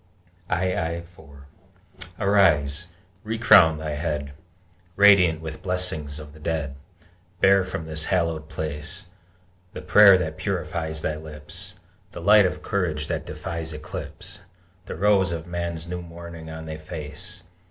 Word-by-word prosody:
II 85 -2 0
4 75 -5 -16 0.7
Arise! 90 -6 +3 0.4
Recrown 110 -7 +5
thy 80 0 -4
head, 75 -2 -3 0.6
Radiant 95 -6 +6
with 80 -1 -7
blessings 90 -6 -1
of 75 -1 -10
the 80 - -14
Dead! 75 -3 -2 0.7
Bear 95 0 +5
from 90 -3 -5
this 80 0 -1
hallowed 85 -4 0
place 80 +3 -3 0.7
The - - -6
prayer 100 -2 +8
that 80 -3 -3
purifies 80 -1 -3
thy 75 - -1
lips, 80 +4 -8 0.4
The - - -7
light 100 +2 +6
of - - -6
courage 85 -7 -1
that - - -3
defies 80 -1 -5
eclipse, 75 0 -7 0.5
The - - -5
rose 95 -1 +3
of 85 -1 -4
Man's 85 -1 -4
new 90 0 -4
morning 85 -1 -10
on 80 0 -7
thy 80 -1 -6
face! 80 +4 -7
85 Hz, 130 wpm, -24 LUFS, 75-90 Hz, 0.7 s, prayer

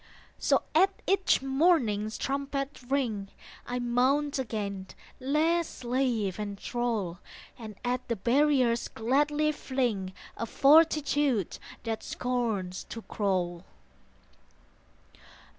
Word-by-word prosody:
So - - +2
at 385 - +6 0.2
each 385 -7 +2
morning's 265 - +2
trumpet 275 0 -3
ring 235 -8 0 0.4
I 245 - -2
mount 260 +4 +1
again, 200 -6 -3 0.3
less 315 +5 +2
slave 240 -6 -1
and 205 -1 -4
thrall, 220 -9 -2 0.4
And 215 -3 -8
at 250 +1 -1
the 235 - 0
barriers 250 +1 +2
gladly 295 +6 +1
fling 245 -10 -2 0.2
A 230 - -3
fortitude 290 - +3 0.2
that 225 -1 -3
scorns 225 -8 -2
to 230 - -8
crawl. 180 -4 -1
245 Hz, 95 wpm, -29 LUFS, 210-280 Hz, 0.4 s, at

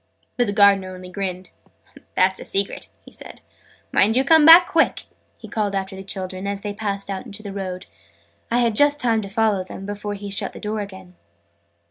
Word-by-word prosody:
But 245 - +1
the - - 0
Gardener 200 -2 +3
only 180 0 -11
grinned. 185 -1 -5 0.6
"That's 190 +1 +2
a - - -9
secret!" 195 0 -3 0.2
he - - -14
said. - - -13 0.5
"Mind 220 +3 +3
you 260 - +3
come 315 +2 +5
back 335 +2 +10
quick!" 330 - +1 0.3
he - - -12
called 205 -2 -2
after 190 0 -3
the 190 - -8
children, 190 0 -6
as 200 0 -3
they 205 -1 -4
passed 200 -1 -4
out 195 +5 -5
into 215 0 -7
the 200 -2 -7
road. 185 -2 -5 0.6
I 235 - +1
had 235 -2 +2
just 290 +3 +4
time 230 -4 +1
to 200 - -7
follow 210 -2 +1
them, 190 +1 -9
before 205 0 -5
he 200 0 -8
shut 195 - -2
the - - -10
door 210 +1 -3
again. 190 -2 -10
200 Hz, 200 wpm, -22 LUFS, 190-220 Hz, 0.6 s, back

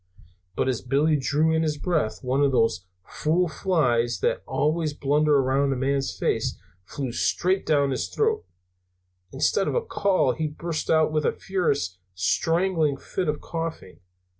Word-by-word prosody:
But - - 0
as 130 -3 -1
Billy 145 +5 +2
drew 150 +4 +1
in 160 - +2
his 155 -2 -1
breath, 155 -9 -1
one 130 +2 +1
of 140 -1 +3
those 115 -8 +1 0.2
fool 170 +4 0
flies 130 -8 +1
that - - +1
are - - -26
always 155 0 0
blundering 145 0 +2
around 135 +1 +2
a - - -3
man's 135 +1 0
face - - -1 0.3
flew 135 +2 -4
straight 185 +9 0
down 140 -3 +2
his 130 - -2
throat. 440 0 0 0.9
Instead 195 - +1
of - - -1
a 475 -1 0
call 200 - +1
he 160 -1 -2
burst 160 +1 -4
out 160 -1 +3
with 155 -1 0
a - - +2
furious, 140 - -1 0.2
strangling 160 - +1
fit 180 +6 -4
of 150 - -2
coughing. 165 - -6
150 Hz, 165 wpm, -25 LUFS, 135-165 Hz, 0.9 s, of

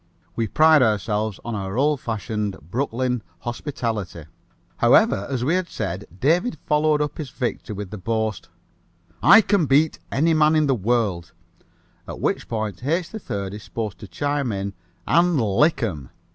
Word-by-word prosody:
We 115 - 0
pride 155 +5 +5
ourselves 105 -2 0
on 120 - -3
our 100 0 -4
old 145 0 +2
fashioned 105 -3 -3
Brooklyn 125 - -2 0.2
hospitality. 115 - -4 0.5
However, 100 - +4
as 125 -3 -2
we 155 - +2
had 185 -1 0
said, 95 +2 -4
David 170 - +2
followed 150 0 +2
up 150 - -6
his 150 -4 -4
victory 120 -4 -4
with 100 -2 -6
the 105 - -6
boast, 110 0 -2 0.7
"I 220 +3 +8
can 195 -6 +1
beat 145 +4 +3
any 160 +4 +2
man 155 0 +4
in 155 -1 +3
the 135 - +2
world," 105 -6 -1 0.7
at - - -7
which - - -1
point 110 0 -4
H. 165 +5 0
3rd 100 - -5
is 105 - -7
supposed 105 -4 -5
to 105 - -9
chime 140 +6 -1
in, 100 0 -3 0.3
"And 170 -2 +3
lick 125 +7 +2
'em." 75 - -3
120 Hz, 160 wpm, -23 LUFS, 105-150 Hz, 0.7 s, I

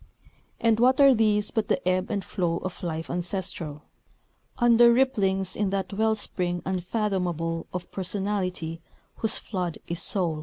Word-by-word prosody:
And 225 -1 +3
what 255 +3 +4
are 275 -1 +8
these 210 -2 +2
but 220 -2 -1
the - - 0
ebb 185 +1 +1
and 200 -4 -2
flow 170 -3 -1
of 185 +1 -6
life 165 -2 -3
ancestral, 175 -4 -4 0.7
under 235 0 +6
ripplings 200 -7 +1
in 205 -2 0
that 195 0 -2
well 220 +2 +2
spring 175 -4 -2
unfathomable 180 -4 -1
of 180 0 -6
personality 185 -4 -2 0.4
whose 220 -1 0
flood 180 -6 -3
is 170 0 -2
Soul. 170 -6 0
190 Hz, 145 wpm, -26 LUFS, 175-215 Hz, 0.7 s, are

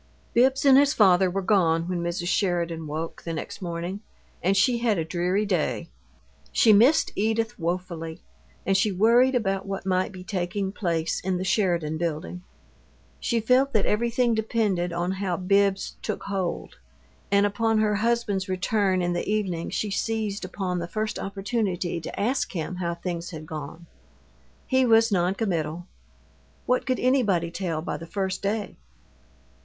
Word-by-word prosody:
Bibbs 265 +3 +3
and 270 -1 +8
his 285 +1 +3
father 190 -3 +5
were 195 +2 -2
gone 170 -5 +2
when 180 -1 -2
Mrs. 175 +1 -2
Sheridan 170 -5 0
woke, 160 +2 -5
the 165 - -5
next 160 - -6
morning, 175 +2 -4 0.4
and 190 +3 +2
she 240 +4 +3
had 230 -4 +1
a 165 - -1
dreary 180 +5 0
day. 150 - -1 0.6
She 220 - +5
missed 245 +10 +5
Edith 225 +2 0
woefully, 170 -1 -4 0.4
and 195 - +2
she 200 +2 +2
worried 235 +7 +4
about 195 -4 -1
what 195 -1 -4
might 185 +1 +1
be 185 -1 -9
taking 190 +1 -2
place 170 -5 -1
in 185 0 -1
the 185 - -3
Sheridan 175 -5 +1
Building. 170 +1 -3 0.8
She 235 - 0
felt 255 +5 +3
that 215 -3 +2
everything 235 +2 +1
depended 215 -5 0
on 175 +2 -1
how 190 -2 -2
Bibbs 195 +1 +1
"took - - -4
hold," 190 -3 -3 0.5
and 200 0 +4
upon 225 +2 +1
her 210 -1 +2
husband's 210 -4 0
return 185 0 +1
in 175 0 0
the 175 - -3
evening 190 -6 -1
she 210 - -2
seized 215 -1 -2
upon 180 -3 -3
the 170 - -4
first 215 +3 -3
opportunity 195 -4 -2
to - - -7
ask 245 +7 0
him 175 +1 -4
how 170 -2 -2
things 170 0 -4
had 155 -3 -8
gone. 155 +2 -7 0.8
He 260 0 +2
was 225 -2 +4
non 180 0 +2
committal. 175 -5 -2 0.8
What 250 +2 +1
could 255 -1 0
anybody 210 -10 +2
tell 170 -4 -3
by - - -3
the 165 - -9
first 190 +1 -2
day? 205 0 -2
190 Hz, 160 wpm, -25 LUFS, 175-215 Hz, 0.8 s, and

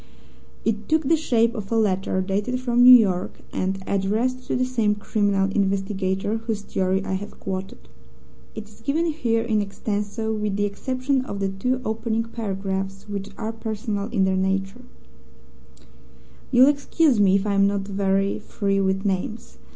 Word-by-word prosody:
It 215 -1 -1
took 315 0 +3
the 325 +4 +3
shape 235 -7 +2
of 210 -4 -6
a - - +2
letter 190 -3 +1
dated 205 +6 -1
from 245 -1 +1
New 250 +1 +10
York, 190 -6 +1
and 190 +1 -2
addressed 220 +6 -1
to - - -1
the 255 - +1
same 225 -5 +1
criminal 200 -2 0
investigator 195 +1 0
whose 225 -2 -4
theory 190 0 -1
I - - -2
have 200 +2 -5
quoted. 185 - -6 0.7
It 215 - -7
is 210 - -19
given 315 +4 0
here 240 -9 0
in 220 -2 +1
extenso, 205 +2 -3
with 210 -2 -2
the 205 - +1
exception 255 +6 -1
of 200 - -5
the 195 -1 0
two 250 +7 -1
opening 225 +1 -1
paragraphs, 195 -3 -4
which 200 -1 -5
are 225 0 -3
personal 215 -2 -3
in 200 -6 +1
their 190 0 +1
nature: 195 +4 -1 1.7
"You'll 255 +2 +6
excuse 285 -2 +2
me 195 -2 +5
if 200 +1 +1
I'm 200 -1 +3
not 200 0 0
very 195 0 0
free 200 -2 -1
with 190 +1 0
names. 200 +4 -3
205 Hz, 160 wpm, -23 LUFS, 195-230 Hz, 1.7 s, New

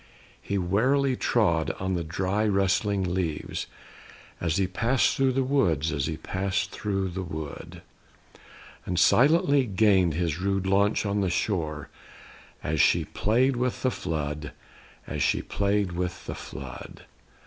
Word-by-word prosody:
He 100 - -2
warily 130 +9 +2
trod 85 -11 +1
on 95 0 -1
the 85 -2 -1
dry 95 +6 -1
rustling 100 0 +1
leaves, 85 -5 -3 0.7
As 80 -3 0
he 95 - +2
pass'd 115 +8 +1
thro' 135 -1 +3
the 130 +1 +1
wood; 85 - +1
as 70 -2 -1
he 80 - -3
pass'd 95 +3 -2
thro' 95 -2 -2
the 95 +1 -4
wood; 80 -4 -7 1.0
And 90 - -3
silently 140 - +4
gain'd 95 -5 +3
his 85 -1 -1
rude 95 0 0
launch 100 +2 +2
on 100 0 0
the 95 - +1
shore, 80 -5 -2 0.7
As 75 -1 +1
she - - +3
play'd 125 +7 +1
with 125 0 -2
the 130 - +2
flood; 75 -5 -4 0.5
as - - -4
she - - +1
play'd 100 -1 0
with 90 +1 -4
the - - -4
flood. 65 0 -9
95 Hz, 140 wpm, -26 LUFS, 85-105 Hz, 1.0 s, silently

